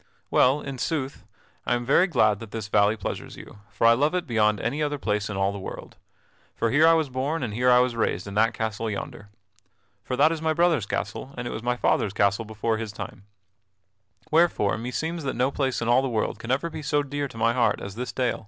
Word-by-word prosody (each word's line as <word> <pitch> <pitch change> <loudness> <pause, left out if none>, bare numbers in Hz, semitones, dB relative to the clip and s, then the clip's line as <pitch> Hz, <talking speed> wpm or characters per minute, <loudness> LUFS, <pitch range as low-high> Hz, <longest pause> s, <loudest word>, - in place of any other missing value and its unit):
"Well, 135 +4 +4
in 135 -2 -6
sooth, 140 -3 -3 0.4
I 120 - +1
am 120 0 -3
very 160 +8 +4
glad 110 - +2
that 115 - -9
this 105 -1 -6
valley 105 +1 +3
pleasures 100 - -6
you; - - -12
for - - -1
I 115 - +8
love 145 +8 +1
it 180 -1 -1
beyond 105 -5 +2
any 130 +7 -2
other 145 -1 -1
place 105 -5 -1
in 105 - -4
all 95 0 +1
the 100 - -6
world. 95 - -8 0.6
For 115 - 0
here 155 +5 +6
was 160 -2 +1
I - - -19
born 135 +4 -2
and 110 -4 -3
here 125 +3 +2
was 125 -1 +2
I - - -9
raised 95 -5 0
in 100 - -7
that 110 +2 +2
castle 110 0 -2
yonder. 105 0 -6 0.7
For 130 - -3
that 150 +4 +4
is 165 -1 -3
my 160 0 +1
brother's 165 - +2
castle 135 +5 -4
and 125 - -4
it - - -4
was 110 - -5
my 125 +1 -1
father's 100 -4 +1
castle 100 +2 +1
before 110 +1 -2
his 110 -2 -4
time; 100 -1 -8 1.1
wherefore 160 -11 +3
meseems 160 +9 -3
that 135 - -2
no 125 +3 +1
place 130 -4 -1
in - - -3
all 120 +2 +5
the 135 - -2
world 110 -2 -1
can 115 - -8
ever 140 +6 0
be - - -6
so 145 0 +1
dear 145 0 -3
to 115 - -13
my 115 +1 +2
heart 120 -1 +2
as 100 - -7
this 125 +4 -5
dale." 125 -2 -1
120 Hz, 235 wpm, -25 LUFS, 110-145 Hz, 1.1 s, I